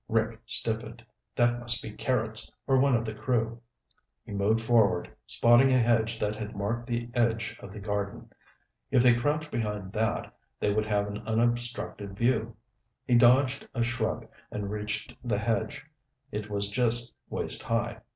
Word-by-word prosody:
Rick - - 0
stiffened. - - -2 0.3
That 120 0 +3
must 120 -1 -2
be 110 - -6
Carrots, 110 -3 -1
or 135 -1 +4
one 135 -1 +4
of 115 0 0
the 110 - -4
crew. 115 0 -1 0.6
He - - -10
moved 100 +3 +2
forward, 110 -6 +2
spotting 120 +3 +5
a 130 - +5
hedge 115 -1 +2
that 105 -1 -1
had 110 0 -6
marked 115 +4 -2
the 120 -1 -3
edge 115 0 +1
of 95 - -10
the 105 - -8
garden. 100 -1 -4 0.6
If 125 - +4
they 125 -1 +7
crouched 150 +5 0
behind 105 -4 -3
that, 110 0 -1 0.2
they 105 - +1
would 110 0 0
have 105 -1 +1
an 105 0 -5
unobstructed 115 -3 -1
view. 115 -1 +1 0.5
He 125 - 0
dodged 130 +3 +5
a 120 - +2
shrub 120 +1 -2 0.2
and 100 -1 -4
reached 105 0 -4
the 120 -1 0
hedge; 110 +1 -1 0.5
it 105 0 -4
was 100 -1 0
just 120 +1 +2 0.2
waist - - -2
high. - - -1
115 Hz, 160 wpm, -28 LUFS, 105-120 Hz, 0.6 s, they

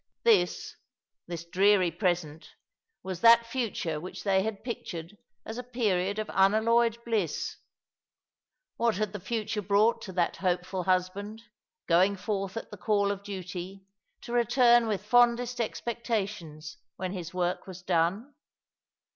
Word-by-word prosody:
This— 460 -2 +2 0.5
this 170 -1 -6
dreary 185 0 +3
present— 170 -6 -2 0.5
was 185 -2 -5
that 235 0 +7
future 230 -10 -2
which 180 - -8
they 195 -2 +3
had 210 0 -4
pictured 180 -6 -6 0.3
as 225 +2 -6
a - - -5
period 205 -6 0
of 215 0 -2
unalloyed 225 +4 +3
bliss. 215 -9 -1 1.2
"What 235 -1 +2
had 215 +1 -2
the 205 - -5
future 215 +1 -3
brought 205 +4 +2
to 190 - -7
that 175 -1 0
hopeful 180 0 -1
husband, 195 +4 -1 0.4
going 185 +4 +4
forth 195 0 -3
at 225 - -6
the 210 - -8
call 200 +1 +1
of 200 -1 -5
duty, 190 -1 -7 0.4
to 240 - -7
return 240 0 +4
with 205 -2 -2
fondest 245 +1 +3
expectations 210 -10 -4 0.2
when 185 0 -4
his 175 -4 -6
work 180 +1 -2
was 185 -1 -9
done 185 - 0
200 Hz, 135 wpm, -28 LUFS, 180-230 Hz, 1.2 s, that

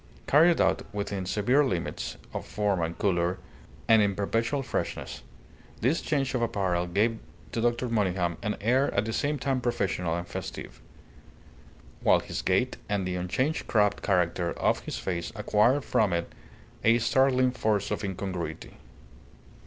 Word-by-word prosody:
Carried 165 +4 +5
out - - +3
within 100 -2 -3
severe 120 +9 +3
limits 90 -11 -3 0.2
of - - -5
form 100 -4 0
and 85 +1 -2
colour, 90 -2 +1 0.5
and 110 -1 +6
in 100 -2 +1
perpetual 115 +7 0
freshness, - - -4 0.6
this 135 +9 +2
change 135 -3 -1
of 125 - 0
apparel 95 -6 0
gave 110 +5 +1 0.3
to 115 - -2
Dr. 120 +1 +1
Monygham 95 -6 0
an 105 - -2
air 125 +6 +2
at 100 - +2
the 115 - -3
same 145 +4 0
time 135 -2 -1
professional 95 -8 -1
and 85 0 -4
festive; - - -7 1.2
while - - +5
his - - -5
gait - - +1
and 100 -2 0
the 90 - -2
unchanged 130 - -1
crabbed 105 -2 +2
character 90 -2 +1
of - - +1
his - - -6
face 85 -2 -3
acquired 120 +7 +2
from 105 -5 +2
it 85 0 -2 0.5
a 115 +1 +5
startling 130 +2 +3
force 105 -5 0
of - - -2
incongruity. 95 -5 -5
105 Hz, 150 wpm, -28 LUFS, 90-125 Hz, 1.2 s, and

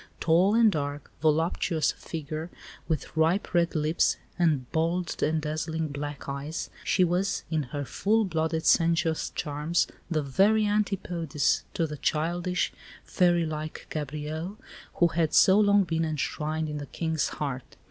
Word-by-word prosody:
Tall 180 +6 +4
and 230 -2 +6
dark, 145 -3 -4
voluptuous 160 0 +1
of - - -18
figure, 155 +1 -5 0.4
with 155 -2 -3
ripe 165 +6 +1
red 170 -1 +2
lips, 155 +1 +2 0.2
and 155 -7 +2
bold 170 +2 -1
and 155 +1 +2
dazzling 155 +1 -2
black 145 0 -6
eyes, 140 +4 -4
she 185 - +3
was, 180 +3 0
in 160 -1 +1
her 145 +1 -4
full 215 - +1
blooded, 160 -2 -1
sensuous 165 -1 +3
charms, 150 +3 0 0.2
the 155 -3 0
very 200 +10 +3
"antipodes" 180 -8 0
to 165 - +1
the 150 -1 -6
childish, 175 +5 0 0.3
fairy 175 -2 +2
like 155 0 -5
Gabrielle 155 +5 -4 0.4
who 175 - +4
had 160 0 0
so 190 +2 +7
long 205 -1 +5
been 165 -2 -1
enshrined 155 0 -2
in 150 -1 -4
the 145 - -7
King's 160 -3 -1
heart. 135 -4 -5
160 Hz, 145 wpm, -27 LUFS, 150-175 Hz, 0.4 s, so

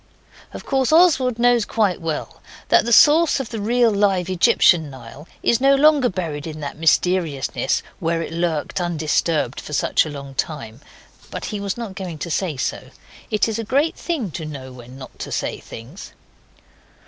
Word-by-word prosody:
Of - - -9
course 265 -1 +1
Oswald 300 -8 +4
knows 240 -1 +3
quite 205 -5 0
well 160 -2 -5 0.3
that - - +4
the 235 - -2
source 300 +6 +6
of 265 - -5
the 225 -3 -5
real 235 +2 +2
live 195 -3 +1
Egyptian 170 -3 +4
Nile 135 +4 -12 0.2
is 235 +1 +2
no 275 +1 +5
longer 285 -2 +4
buried 165 -5 -4
in 155 -1 -7
that 145 - -5
mysteriousness 165 -3 +1 0.2
where 165 0 -1
it 165 - -7
lurked 170 0 -2
undisturbed 160 -4 -1
for 150 - -9
such 140 - +2
a 155 - -6
long 140 -2 -8
time. 135 -4 -5 0.5
But - - -6
he 210 - -3
was 200 +1 -3
not 230 -5 -6
going 185 -4 -6
to 165 +3 -5
say 165 -4 -1
so. - - -4 0.4
It 210 0 +1
is 225 0 -3
a - - -2
great 280 +8 +1
thing 280 - -3
to 160 - -6
know 140 -4 -8
when 125 +1 -12
not 130 - -12
to - - -6
say - - -3
things. 125 - -11
180 Hz, 180 wpm, -21 LUFS, 150-235 Hz, 0.5 s, source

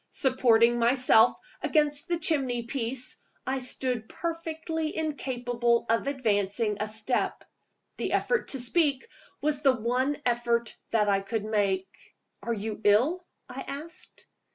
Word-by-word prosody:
Supporting 240 -3 +3
myself 240 -1 +5 0.2
against 295 0 +1
the 345 -1 0
chimney 265 -8 +1
piece, 245 +1 -2 0.2
I 265 +1 -1
stood 250 -3 -2
perfectly 320 -1 -4
incapable 245 -6 0
of 230 +4 +1
advancing 210 -5 0
a 210 - -1
step. 220 +3 -1 0.5
The - - -2
effort 485 -1 +1
to 270 - +1
speak 280 - +1 0.3
was 295 -1 0
the 270 -3 +4
one 255 +5 0
effort 235 -1 0
that 215 -2 +2
I 200 -1 +3
could 205 +2 -3
make. 200 -3 -2 0.3
"Are 235 - -3
you 215 -1 -4
ill?" 250 - +3 0.2
I 255 +2 -7
asked. 300 +4 -7
245 Hz, 130 wpm, -28 LUFS, 225-285 Hz, 0.5 s, myself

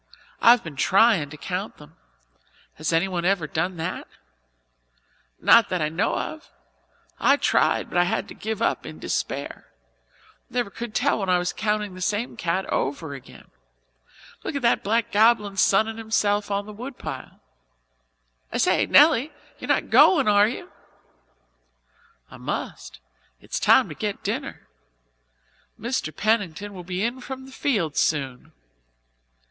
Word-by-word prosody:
I've 235 0 +6
been 155 -5 -9
tryin' 195 - +3
to 150 - -10
count 185 +6 -5
them. 150 - -16 0.8
Has 155 +2 -3
anyone 175 +1 0
ever 185 -3 +1
done 170 +4 -2
that?" 160 - -4 1.3
"Not 230 -3 +6
that 180 - -1
I 155 -1 0
know 170 +8 0
of. 315 - -6 0.7
I 275 - +4
tried - - +2
but 175 - 0
I 175 - +4
had 220 +5 -2
to - - -8
give 220 0 -4
up - - 0
in - - -9
despair - - -4 0.8
never 240 -5 -2
could 235 0 -7
tell 275 -2 +1
when 195 -2 -2
I 180 - +4
was 180 0 -2
counting 210 -2 -1
the 185 - -10
same 210 +6 -2
cat 180 +2 -1
over 145 +2 -2
again. 135 -2 -13 0.9
Look - - -4
at 280 - -3
that 235 - +2
black 225 +2 0
goblin 210 -1 +3
sunning 220 +3 +2
himself 210 -2 0
on 200 0 -1
the 210 - -9
woodpile. 245 +5 -8 1.1
I - - -2
say, - - +2
Nelly, 295 -1 +5 0.3
you're - - -7
not - - 0
going, 285 - +6
are 205 0 +5
you?" 235 - -6 1.6
"I - - -11
must. - - -6 0.4
It's - - -4
time - - +5
to - - -6
get - - -4
dinner. - - -4 1.1
Mr. 235 -8 -2
Pennington 205 +1 -1
will 180 -2 -8
be 180 +2 -3
in 240 +3 -2
from 265 +1 -7
the 265 - -13
fields 200 - -1
soon." 135 -5 -1
205 Hz, 145 wpm, -24 LUFS, 175-230 Hz, 1.6 s, I've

